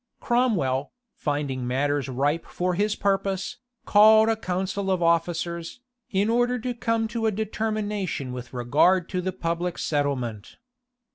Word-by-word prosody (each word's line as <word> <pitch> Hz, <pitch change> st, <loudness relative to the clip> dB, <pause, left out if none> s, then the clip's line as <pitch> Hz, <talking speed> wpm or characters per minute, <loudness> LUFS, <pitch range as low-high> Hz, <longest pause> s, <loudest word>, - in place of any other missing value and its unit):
Cromwell, 195 Hz, -, +1 dB, 0.2 s
finding 140 Hz, -4 st, -2 dB
matters 140 Hz, +2 st, 0 dB
ripe 145 Hz, +5 st, 0 dB
for 180 Hz, 0 st, -1 dB
his 205 Hz, +3 st, 0 dB
purpose, 195 Hz, -1 st, -1 dB, 0.3 s
called 220 Hz, +1 st, +6 dB
a 225 Hz, -, +3 dB
council 190 Hz, -1 st, -2 dB
of 185 Hz, -2 st, +1 dB
officers, 170 Hz, +2 st, 0 dB, 0.3 s
in 195 Hz, +1 st, +1 dB
order 245 Hz, +2 st, +2 dB
to 250 Hz, +1 st, -3 dB
come 230 Hz, -1 st, 0 dB
to 230 Hz, -1 st, -1 dB
a -, -, +2 dB
determination 210 Hz, -8 st, -2 dB
with 125 Hz, -1 st, -7 dB
regard 145 Hz, +9 st, +3 dB
to 185 Hz, -1 st, -1 dB
the 185 Hz, +1 st, -2 dB
public 175 Hz, -1 st, -2 dB
settlement. 130 Hz, -8 st, -2 dB
180 Hz, 135 wpm, -25 LUFS, 145-215 Hz, 0.3 s, called